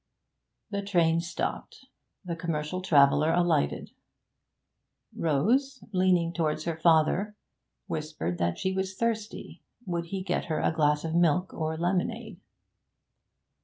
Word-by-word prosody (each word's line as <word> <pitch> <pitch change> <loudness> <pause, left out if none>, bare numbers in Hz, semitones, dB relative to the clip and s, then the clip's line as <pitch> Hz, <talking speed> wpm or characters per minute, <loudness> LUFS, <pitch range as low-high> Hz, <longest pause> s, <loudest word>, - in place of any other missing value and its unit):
The 200 -1 -1
train 170 -5 +2
stopped. 170 +1 -5 0.4
The 170 -2 -3
commercial 165 +1 -3
traveller 150 -3 +4
alighted. 170 - +1 1.2
Rose, 240 - +1
leaning 180 -3 +2
towards 155 -2 -1
her 170 0 -2
father, 165 +6 +2 0.5
whispered 150 - -4
that 85 0 0
she 190 - -1
was 190 0 -2
thirsty; 225 -1 -3 0.2
would 170 -2 -2
he 190 +2 -4
get 180 -2 -1
her 160 - -2
a - - +1
glass 150 -2 +2
of 160 - -3
milk 175 +2 +2
or 160 0 -2
of 160 - -7
lemonade? 195 +3 -2
170 Hz, 125 wpm, -28 LUFS, 155-190 Hz, 1.2 s, traveller